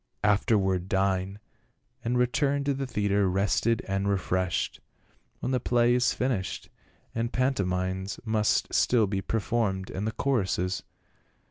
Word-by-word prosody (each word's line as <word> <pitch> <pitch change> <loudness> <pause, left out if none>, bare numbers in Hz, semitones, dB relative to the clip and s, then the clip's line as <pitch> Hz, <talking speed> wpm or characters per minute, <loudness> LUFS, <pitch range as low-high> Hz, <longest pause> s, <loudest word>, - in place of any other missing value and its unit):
"Afterward 100 -3 +2
dine, 95 0 0 0.7
and 120 +2 0
return 140 +3 +1
to 140 0 +1
the 135 0 -3
theatre 100 -4 +1
rested 100 +4 +1
and 95 +1 0
refreshed; 95 -2 -1 0.6
when - - -1
the 130 - +2
play 120 0 +3
is 125 0 +3
finished 125 -7 -2 0.4
the 115 +1 -1
pantomimes 95 -7 -1
must 110 -1 +1
still 120 -3 +4
be 95 -1 -2
performed, 105 -3 -1
and 100 +3 -3
the - - 0
choruses." 95 -8 0
105 Hz, 125 wpm, -28 LUFS, 95-120 Hz, 0.7 s, still